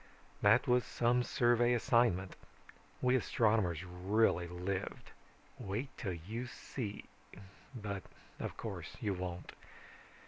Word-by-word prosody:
"That - - +5
was 125 0 +4
some 120 +1 +2
survey 120 -1 +3
assignment. 115 -6 +2 0.7
We 125 0 +4
astronomers 105 -8 +2
really 90 0 +2
lived. 90 +2 -4 0.5
Wait 105 +8 -3
till 95 -4 -3
you 110 +9 -5
see 120 -4 -6 0.7
but 100 -4 -4 0.4
of - - -4
course - - -6
you 100 - 0
won't. 90 -2 -5
105 Hz, 105 wpm, -35 LUFS, 90-120 Hz, 0.7 s, That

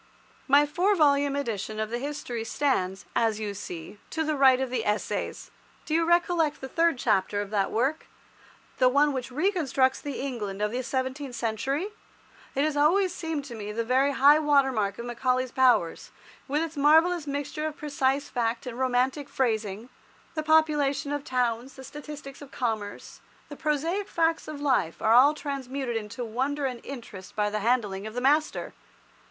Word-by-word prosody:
My 285 +2 +6
four 360 +8 +1
volume 285 -3 +3
edition 220 -6 -3
of 215 0 -2
the 240 - -2
History 255 -4 -4
stands, 195 -7 -1
as 225 -2 +1
you 210 -2 -3
see, 185 -1 -8
to 320 - -1
the 310 -1 0
right 265 -2 +5
of 265 -2 -2
the 240 -3 -1
Essays. 210 0 -2 0.3
Do 310 - -3
you 330 +1 +3
recollect 345 -2 +2
the 265 - -6
third 330 +1 +2
chapter 195 -3 +1
of 205 0 -4
that 200 -2 +1
work—the 255 0 -2
one 285 +2 +3
which 255 -3 -4
reconstructs 275 -4 +1
the 285 -2 -5
England 220 -8 -4
of 210 0 0
the 250 +2 -2
seventeenth 260 +1 -3
century? 255 - -2 0.7
It 275 - +2
has 305 -1 0
always 350 +6 +3
seemed 320 -5 -4
to 260 - -8
me 210 -2 -6
the 230 +2 -2
very 260 +4 +2
high 285 +3 +6
water 285 -3 +3
mark 205 -4 -1
of 235 - -6
Macaulay's 250 +1 0
powers, 250 -10 +2 0.4
with 295 +3 0
its 330 0 -5
marvellous 320 +3 +4
mixture 290 +2 -3
of 305 - -6
precise 280 -1 0
fact 235 0 -2
and 250 -1 -6
romantic 260 +3 0
phrasing. 220 -2 -1 0.4
The 310 - -2
population 305 -3 +2
of 290 -1 -2
towns, 250 0 -1
the 265 - -10
statistics 295 -1 -9
of 285 - -10
commerce, 220 -6 -4 0.3
the 290 - -7
prosaic 325 +8 -1
facts 330 -1 0
of 305 -2 -6
life 260 - +1
are 220 - +3
all 275 +5 +7
transmuted 270 -4 -4
into 225 +2 -4
wonder 270 +6 -1
and 250 -3 -4
interest 225 -8 -9
by 210 -1 0
the 215 - -1
handling 210 -3 0
of 220 - -9
the 245 - -2
master. 300 +4 +1
265 Hz, 175 wpm, -27 LUFS, 230-295 Hz, 0.7 s, all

